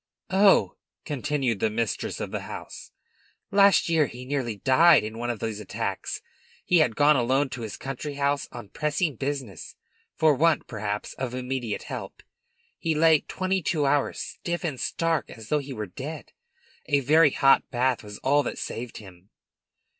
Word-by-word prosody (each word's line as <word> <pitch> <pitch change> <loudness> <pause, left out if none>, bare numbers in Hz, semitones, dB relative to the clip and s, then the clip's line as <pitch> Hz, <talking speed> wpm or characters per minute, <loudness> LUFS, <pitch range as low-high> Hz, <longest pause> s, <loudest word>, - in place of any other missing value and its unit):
"Oh," 195 0 +4 0.3
continued 140 -6 -1
the 110 - +2
mistress 110 -1 -2
of - - -4
the - - -2
house, - - -9 0.6
"last 200 -1 +5
year 160 -4 +3
he 125 +1 -9
nearly 130 -5 -2
died 145 - +5
in 110 +1 -6
one 120 0 -2
of 120 - -2
these 110 -1 -3
attacks. 105 - -4 0.4
He 180 - +4
had 125 -8 +2
gone 150 +1 +5
alone 130 +3 +2
to 125 - -6
his 110 -3 -6
country 135 +2 -5
house 140 0 0
on 120 -5 -9
pressing 150 - -1
business. 135 - -5 0.4
For 155 -1 +4
want, 160 +4 +2
perhaps, 105 -2 -4
of 130 -1 -3
immediate 125 -3 -3
help, - - -7 0.6
he 160 -1 0
lay 160 0 +5
twenty 190 +3 -2
two 150 -2 0
hours 140 0 +1
stiff 175 +1 -4
and 150 -7 -3
stark 165 -2 -1
as 110 -2 -11
though 150 - +2
he 140 -1 -8
were 110 -5 -4
dead. 140 - -8 0.6
A 140 -1 +2
very 150 +3 +5
hot 135 0 +3
bath 125 -1 0
was 105 0 -9
all 145 +2 +4
that - - -4
saved 120 0 -5
him." 95 -2 -14
135 Hz, 170 wpm, -26 LUFS, 115-150 Hz, 0.6 s, last